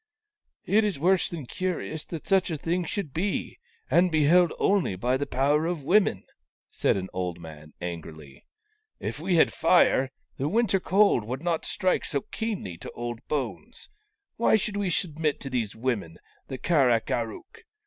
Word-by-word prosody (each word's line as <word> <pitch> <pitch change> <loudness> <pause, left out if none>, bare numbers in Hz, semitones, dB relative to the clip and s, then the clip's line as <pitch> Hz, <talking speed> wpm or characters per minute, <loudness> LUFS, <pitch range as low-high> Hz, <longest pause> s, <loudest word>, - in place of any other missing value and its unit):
" - - -51
It 220 - +5
is 205 -6 -1
worse 180 +5 +2
than 160 -6 -6
curious 175 -1 -3
that 165 -3 -7
such 195 -1 +2
a 160 - -2
thing 170 +4 -1
should 160 -5 -4
be, 190 +4 -2 0.3
and 180 +1 +3
be 155 -1 +3
held 175 +3 +5
only 195 - +2
by 125 +7 0
the 145 +2 -2
power 145 +5 +2
of 170 -4 -3
women," 180 - +3 0.5
said - - +1
an 95 -1 -4
old 90 -2 -3
man, 80 -2 -11
angrily. 80 -5 -8 0.6
"If - - -4
we 180 - 0
had 165 - +4
fire, 160 -5 +4 0.3
the 140 +3 -1
winter 215 -2 +2
cold 195 - +3
would 130 +6 -5
not 170 -2 -1
strike 185 -1 0
so 140 -3 -2
keenly 200 - -4
to - - -8
old 120 -1 -5
bones. 150 - -4 0.5
Why 235 - +4
should 210 -1 -1
we 200 -2 0
submit 160 -4 -1
to 135 - -6
these 115 -5 -2
women, 110 -9 -2 0.3
the 130 - -5
Kar 145 -4 +3
ak 115 -2 +1
ar 115 -1 0
ook 355 - -13
155 Hz, 180 wpm, -27 LUFS, 120-185 Hz, 0.6 s, It